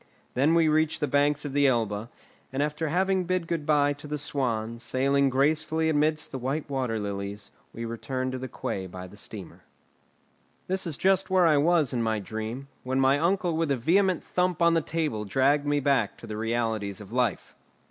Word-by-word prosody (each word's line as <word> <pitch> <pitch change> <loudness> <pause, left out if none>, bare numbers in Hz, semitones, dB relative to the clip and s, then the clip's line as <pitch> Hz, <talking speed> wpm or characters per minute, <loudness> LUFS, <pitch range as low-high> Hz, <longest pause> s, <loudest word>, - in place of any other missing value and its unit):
Then 145 +6 +3
we 165 -1 +4
reached 155 0 +2
the 150 - +1
banks 145 +2 +2
of 140 - -4
the 145 0 +4
Elbe, 110 -3 0 0.4
and 135 +2 0
after 150 +2 -2
having 185 +3 +1
bid 185 -1 0
good 165 -3 -3
bye 145 -1 +3
to 145 +1 -11
the 150 0 -3
swan, 115 -6 -2
sailing 135 +4 +2
gracefully 155 +4 +1
amidst 155 0 +1
the 135 - -4
white 135 +5 -2
water 130 -5 -1
lilies, 100 0 -5 0.2
we 115 - -6
returned 130 +3 -3
to 130 - -4
the 130 - -5
quay 95 -5 -4
by 90 0 -8
the 95 +2 -13
steamer. 105 -3 -9 1.0
That 190 -1 0
is 155 -5 -4
just 190 0 +2
where 185 -2 +4
I 155 -3 +5
was 155 -2 +3
in 120 - 0
my 110 -1 0
dream, 110 +6 -5
when 130 +1 -1
my 135 +2 +4
uncle 175 0 +1
with 165 -1 0
a 140 - +2
vehement 180 +7 +2
thump 180 -2 0
on 170 0 +4
the 165 - +3
table 150 -9 -2
dragged 140 +7 +2
me 145 0 +2
back 140 -1 +1
to - - -11
the 110 -1 -6
realities 110 -3 -1
of 105 -1 -11
life. 120 -4 -1
140 Hz, 200 wpm, -27 LUFS, 115-160 Hz, 1.0 s, I